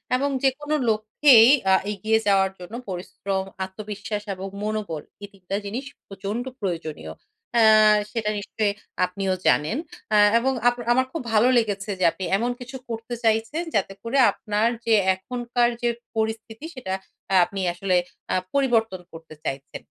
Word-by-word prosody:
এবং 280 +2 +1
যেকোনো 295 +3 +1
লক্ষ্যেই 225 +3 +6 0.2
আ - - +6 0.2
এগিয়ে 220 +3 +1
যাওয়ার 195 -1 +4
জন্য 180 +5 -10 0.2
পরিশ্রম, 190 +1 -3 0.2
আত্মবিশ্বাস 210 +1 -6
এবং 190 +1 -6 0.2
মনোবল, 210 -8 -3 0.2
এই - - -5
৩ 190 -2 -22
টা 195 - 0
জিনিস 240 +7 -4 0.2
প্রচন্ড 200 +4 -4 0.2
প্রয়োজনীয়। 165 -6 -4 0.5
আ - - +6 0.5
সেটা 220 -2 -1
নিশ্চয়ই 205 0 -1 0.3
আপনিও 190 +1 -2
জানেন। 155 - +3 0.4
আ - - +6 0.2
এবং 265 +2 +1
আপ 245 - +4 0.2
আমার 260 +1 +2
খুব 330 - -4
ভালো 215 +3 +5
লেগেছে 205 -3 -1
যে - - 0
আপনি 190 - -6
এমন 240 +3 0
কিছু 245 +2 -9
করতে 230 +1 -5
চাইছেন 225 +8 +1
যাতে 195 -1 0
করে 235 +4 -1
আপনার 210 +1 0 0.2
যে 225 - +3 0.2
এখনকার 240 +4 -1
যে 240 - +2 0.3
পরিস্থিতি 220 +4 -3
সেটা 190 -8 -4 0.4
আ - - +5
আপনি 195 -1 -5
আসলে 185 +1 0 0.4
আ - - +2 0.2
পরিবর্তন 225 -9 +1
করতে 160 -1 -11
চাইছেন। 135 +1 -5
215 Hz, 150 wpm, -24 LUFS, 195-240 Hz, 0.5 s, লক্ষ্যেই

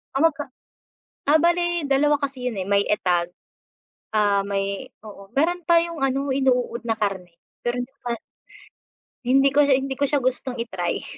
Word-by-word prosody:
Tama 320 +4 +5
ka. 290 +1 -5 0.9
Ah, 310 - +6
bale 345 -1 +1
dalawa 290 +2 +3
kasi 275 -3 -3
yun, 215 - -6
eh, 185 - -3
may 200 0 +3
Etag, 175 -4 +1 0.8
ah, 205 -2 +2
may, 195 0 -3 0.2
oo, 195 -2 -12
meron 350 +5 +1
pa 340 +1 +5
yung 335 -3 -3
ano 270 0 0
inuuod 250 -3 +1
na 225 -1 -2
karne, 195 -4 -2 0.3
pero 240 +1 -1
hindi 245 +1 -4
ko - - -47
pa. 235 - -3 1.1
Hindi 270 +2 +4
ko 280 - +2
siya 270 - +5
hindi 270 0 -2
ko - - +1
siya 280 -1 0
gustong 255 0 -1
i-try. 190 -7 -3
260 Hz, 170 wpm, -23 LUFS, 205-285 Hz, 1.1 s, Ah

